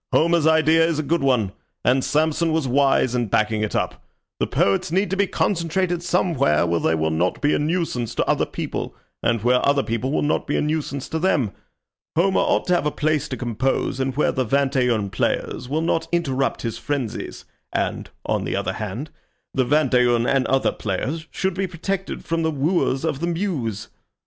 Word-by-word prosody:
"Homer's 165 Hz, -1 st, +3 dB
idea 160 Hz, 0 st, +4 dB
is 165 Hz, -2 st, +1 dB
a 155 Hz, -, -1 dB
good 170 Hz, +4 st, 0 dB
one, 125 Hz, -8 st, +2 dB, 0.3 s
and 130 Hz, +1 st, +3 dB
Samson 160 Hz, +2 st, +1 dB
was 160 Hz, -3 st, 0 dB
wise 135 Hz, -1 st, +3 dB
in 120 Hz, -2 st, 0 dB
backing 110 Hz, +1 st, +1 dB
it 105 Hz, -, -2 dB
up. -, -, -2 dB, 0.4 s
The -, -, +1 dB
poets 100 Hz, +10 st, +1 dB
need 190 Hz, +2 st, +1 dB
to -, -, +1 dB
be 200 Hz, 0 st, +2 dB
concentrated 175 Hz, 0 st, 0 dB
somewhere 165 Hz, -, +2 dB
where 85 Hz, 0 st, +1 dB
they 80 Hz, -, +1 dB
will 80 Hz, 0 st, 0 dB
not 85 Hz, +3 st, 0 dB
be 145 Hz, -, +2 dB
a -, -, +1 dB
nuisance 150 Hz, -7 st, -1 dB
to -, -, +1 dB
other -, -, +1 dB
people, -, -, -4 dB, 0.3 s
and 115 Hz, -3 st, 0 dB
where 125 Hz, +1 st, +3 dB
other 140 Hz, -1 st, +3 dB
people 115 Hz, +4 st, -2 dB
will -, -, +1 dB
not 150 Hz, -, 0 dB
be 145 Hz, -, 0 dB
a -, -, +1 dB
nuisance 150 Hz, -3 st, -2 dB
to 160 Hz, -, -2 dB
them. 150 Hz, -, +1 dB, 0.6 s
Homer 190 Hz, +4 st, +3 dB
ought -, -, +2 dB
to -, -, +4 dB
have 170 Hz, -4 st, +2 dB
a -, -, +3 dB
place 155 Hz, 0 st, 0 dB
to -, -, -4 dB
compose 125 Hz, +2 st, -1 dB
in 130 Hz, 0 st, 0 dB
where 150 Hz, -, +2 dB
the 130 Hz, -, 0 dB
vingt 140 Hz, +3 st, +1 dB
et 125 Hz, -2 st, +3 dB
un 105 Hz, -5 st, 0 dB
players 125 Hz, -, -2 dB
will 155 Hz, +3 st, 0 dB
not 165 Hz, 0 st, 0 dB
interrupt 135 Hz, -6 st, 0 dB
his 115 Hz, -2 st, -3 dB
frenzies, 135 Hz, -7 st, -4 dB, 0.3 s
and, -, -, -2 dB, 0.2 s
on -, -, 0 dB
the -, -, -2 dB
other -, -, -1 dB
hand, 110 Hz, +9 st, -5 dB, 0.4 s
the 130 Hz, -2 st, +1 dB
vingt 145 Hz, 0 st, +2 dB
et 125 Hz, -1 st, +5 dB
un 120 Hz, 0 st, +2 dB
and 135 Hz, 0 st, +2 dB
other 135 Hz, 0 st, +2 dB
players 140 Hz, -, -3 dB
should 190 Hz, -1 st, -1 dB
be 190 Hz, +1 st, -1 dB
protected 190 Hz, +3 st, -4 dB
from 165 Hz, 0 st, -1 dB
the 160 Hz, -, +1 dB
wooers 150 Hz, -1 st, 0 dB
of 150 Hz, -4 st, -1 dB
the 170 Hz, -, -1 dB
muse. 165 Hz, -, -2 dB
145 Hz, 205 wpm, -22 LUFS, 125-165 Hz, 0.6 s, et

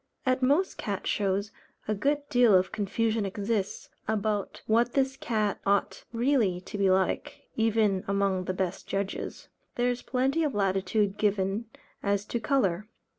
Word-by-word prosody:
At 255 Hz, 0 st, +2 dB
most 290 Hz, +9 st, +2 dB
cat 200 Hz, -2 st, -3 dB
shows, 200 Hz, +1 st, 0 dB, 0.4 s
a 215 Hz, -, +1 dB
good 285 Hz, +7 st, 0 dB
deal 245 Hz, -5 st, +5 dB
of 185 Hz, 0 st, +3 dB
confusion 220 Hz, +2 st, 0 dB
exists, 200 Hz, 0 st, -2 dB, 0.2 s
about 210 Hz, -1 st, -1 dB
what 235 Hz, +2 st, +2 dB
this 265 Hz, -1 st, +1 dB
cat 215 Hz, -6 st, -1 dB
ought 200 Hz, 0 st, 0 dB
really 235 Hz, -6 st, +2 dB
to 190 Hz, -, -9 dB
be 200 Hz, -1 st, +2 dB
like, 185 Hz, 0 st, 0 dB
even 215 Hz, -4 st, +2 dB
among 195 Hz, -2 st, +1 dB
the 185 Hz, -, -1 dB
best 185 Hz, -1 st, -3 dB
judges. 195 Hz, 0 st, -4 dB, 0.3 s
There 245 Hz, +1 st, +2 dB
is 245 Hz, 0 st, -4 dB
plenty 270 Hz, +5 st, +1 dB
of 290 Hz, -6 st, -1 dB
latitude 195 Hz, +1 st, +1 dB
given 200 Hz, +1 st, 0 dB, 0.4 s
as 200 Hz, 0 st, 0 dB
to 235 Hz, -, +1 dB
colour. 210 Hz, -7 st, +1 dB
210 Hz, 150 wpm, -28 LUFS, 195-240 Hz, 0.4 s, deal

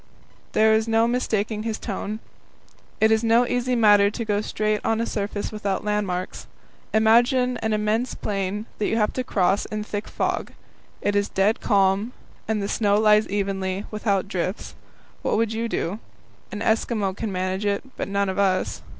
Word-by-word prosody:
there 220 Hz, 0 st, +5 dB
is 220 Hz, +1 st, +2 dB
no 225 Hz, 0 st, +3 dB
mistaking 220 Hz, -3 st, -1 dB
his 220 Hz, 0 st, -3 dB
tone. 210 Hz, 0 st, -4 dB, 0.8 s
It 220 Hz, 0 st, +4 dB
is 220 Hz, +1 st, +3 dB
no 230 Hz, +2 st, +4 dB
easy 245 Hz, +1 st, 0 dB
matter 205 Hz, -3 st, +5 dB
to 230 Hz, +2 st, -5 dB
go 205 Hz, -1 st, 0 dB
straight 215 Hz, 0 st, -1 dB
on 225 Hz, 0 st, +1 dB
a 230 Hz, -, 0 dB
surface 205 Hz, -2 st, -3 dB
without 205 Hz, -2 st, -2 dB
landmarks. 200 Hz, -3 st, -2 dB, 0.4 s
Imagine 240 Hz, +3 st, +3 dB
an 220 Hz, -, -2 dB
immense 215 Hz, +3 st, 0 dB
plain 200 Hz, +1 st, -3 dB
that 210 Hz, -, +1 dB
you 225 Hz, -, 0 dB
have 210 Hz, -2 st, +1 dB
to 255 Hz, -, -2 dB
cross 195 Hz, -4 st, +1 dB
in 215 Hz, 0 st, -4 dB
thick 205 Hz, 0 st, -5 dB
fog; -, -, -2 dB, 0.5 s
it 205 Hz, -, +1 dB
is 205 Hz, 0 st, +1 dB
dead 205 Hz, +5 st, +2 dB
calm, 200 Hz, +3 st, +2 dB, 0.3 s
and 215 Hz, -2 st, 0 dB
the -, -, -1 dB
snow 205 Hz, -1 st, +2 dB
lies 215 Hz, 0 st, +4 dB
evenly, 195 Hz, -1 st, -2 dB
without 205 Hz, -2 st, 0 dB
drifts. 185 Hz, +1 st, -3 dB, 0.5 s
What -, -, 0 dB
would 225 Hz, 0 st, +1 dB
you 230 Hz, +1 st, -2 dB
do? 200 Hz, -1 st, -2 dB, 0.5 s
An 210 Hz, -, -5 dB
Eskimo 220 Hz, -3 st, 0 dB
can 215 Hz, 0 st, -4 dB
manage 185 Hz, +2 st, -2 dB
it, 200 Hz, 0 st, 0 dB
but -, -, -3 dB
none 200 Hz, 0 st, 0 dB
of 190 Hz, +1 st, -2 dB
us. 190 Hz, -2 st, +1 dB
210 Hz, 175 wpm, -24 LUFS, 200-225 Hz, 0.8 s, there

